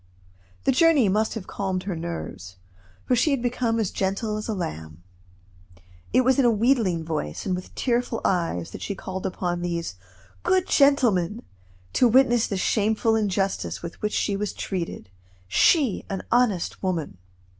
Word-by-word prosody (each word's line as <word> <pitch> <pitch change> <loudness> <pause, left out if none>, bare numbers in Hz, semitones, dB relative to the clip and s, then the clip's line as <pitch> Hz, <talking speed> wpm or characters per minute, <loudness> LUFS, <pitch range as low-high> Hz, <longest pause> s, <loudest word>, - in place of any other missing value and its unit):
The - - +3
journey 290 - +4
must 215 +4 +1
have 210 -5 -5
calmed 190 -2 -3
her 190 -3 -3
nerves, 160 - -6 0.5
for 250 - +2
she 250 +6 +2
had 275 -4 +1
become 240 -2 0
as 210 -5 0
gentle 200 +3 -1
as 215 - -4
a 220 - -2
lamb. 80 - -6 1.1
It 255 - +4
was 260 +2 +3
in 265 - +4
a - - +6
wheedling 220 -7 +2
voice, 150 - -4
and 190 - 0
with 180 - -8
tearful 240 -2 0
eyes, 165 - 0
that - - -8
she 200 - -3
called 190 0 -5
upon 175 -1 -2
these 170 - -3 0.4
"good 370 -1 +2
gentlemen" 240 - +3 0.5
to 250 - +5
witness 240 -1 +4
the 200 - -2
shameful 220 +3 +1
injustice 195 -4 -1
with 170 - -8
which 210 0 -1
she 200 - 0
was 205 +1 -2
treated 170 - -5 0.4
she, 260 - +3
an 195 -2 -4
honest 235 -8 +1
woman. 165 - -2
200 Hz, 160 wpm, -25 LUFS, 175-240 Hz, 1.1 s, a